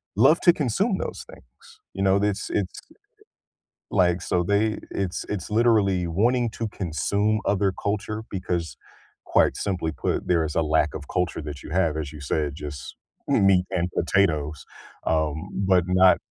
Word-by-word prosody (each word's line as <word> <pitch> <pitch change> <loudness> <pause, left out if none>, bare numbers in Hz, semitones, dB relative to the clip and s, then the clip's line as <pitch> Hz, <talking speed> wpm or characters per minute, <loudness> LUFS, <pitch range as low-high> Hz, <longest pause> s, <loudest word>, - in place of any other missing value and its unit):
love 135 +10 +5
to 175 - +6
consume 180 - 0
those - - -5
things, 65 +1 -19 0.3
you 95 +1 -2
know, 95 +1 +4
this 105 -1 -1
it's 95 -3 -2 1.1
like, 90 -2 +2
so 90 0 0
they 105 +3 +1
it's 95 -2 -3
it's 100 -5 -3
literally 105 -5 +3
wanting 115 +7 +1
to 115 0 -4
consume 100 +4 -1
other 100 -1 +2
culture 105 +1 -2
because, 90 -3 -3 0.5
quite - - +3
simply 90 -5 -2
put, - - -2
there 85 -3 +3
is 75 - -4
a 85 - +2
lack 75 -1 +2
of - - -6
culture 90 -2 -1
that 75 -2 -7
you - - -10
have, 85 -3 +1
as 75 -1 -4
you 75 - -10
said, 70 0 -1
just 75 -2 -7 0.4
m 100 - +4
meat 95 -2 +4
and 90 0 0
potatoes, 80 -5 +1 0.4
um, 80 -1 0
but 95 -3 +2
not 95 0 +5
95 Hz, 160 wpm, -24 LUFS, 80-105 Hz, 1.1 s, to